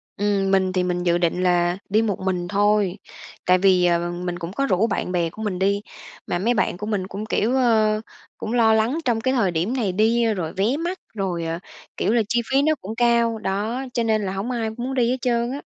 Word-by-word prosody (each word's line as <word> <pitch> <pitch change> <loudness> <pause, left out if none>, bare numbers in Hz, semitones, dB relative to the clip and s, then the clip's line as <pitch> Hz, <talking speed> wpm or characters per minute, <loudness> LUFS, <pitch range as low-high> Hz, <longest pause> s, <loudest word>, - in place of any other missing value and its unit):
Ừm, 200 -1 0
mình 190 -1 +2
thì 185 -1 +1
mình 180 0 -1
dự 175 -1 +2
định 175 +1 0
là 175 0 +2
đi 215 +3 +3
một 210 -4 -1
mình 180 -2 -2
thôi, 205 -1 +2 0.5
tại 180 0 +5
vì, 185 -1 +4
ờ, 175 0 +1
mình 175 0 -4
cũng 170 +2 -6
có 275 +4 0
rủ 205 0 +2
bạn 190 -3 -2
bè 170 -2 0
của 215 - -10
mình 195 -4 -2
đi, 200 +1 +1 0.5
mà 175 - -1
mấy 235 +5 +2
bạn 195 - 0
của 210 - -5
mình 200 -3 -2
cũng, 205 +3 -6
kiểu, 230 +3 0
ơ, 220 -4 +3 0.4
cũng 220 - -4
lo 225 -2 +4
lắng 225 +7 +2
trong 230 -2 +1
cái 260 +2 +1
thời 200 -8 +2
điểm 170 +9 -1
này 220 -8 0
đi 225 +4 +2
rồi 165 -5 -4
vé 215 +9 +1
mắc, 355 +2 -3
rồi, 180 -5 -2
ờ, 165 +1 -3 0.4
kiểu 220 - +1
là, 235 - +4
chi 240 0 +2
phí 270 +1 +4
nó 310 +1 +2
cũng 215 +4 -6
cao, 235 -1 +2
đó, 215 +6 -2
cho 235 - 0
nên 220 -1 +1
là 190 -1 -3
hổng 205 +6 -3
ai 225 -2 -1
muốn 255 +2 -3
đi 240 -2 +2
hết 260 - 0
trơn 240 -1 0
á. 280 - -5
205 Hz, 240 wpm, -22 LUFS, 180-235 Hz, 0.5 s, tại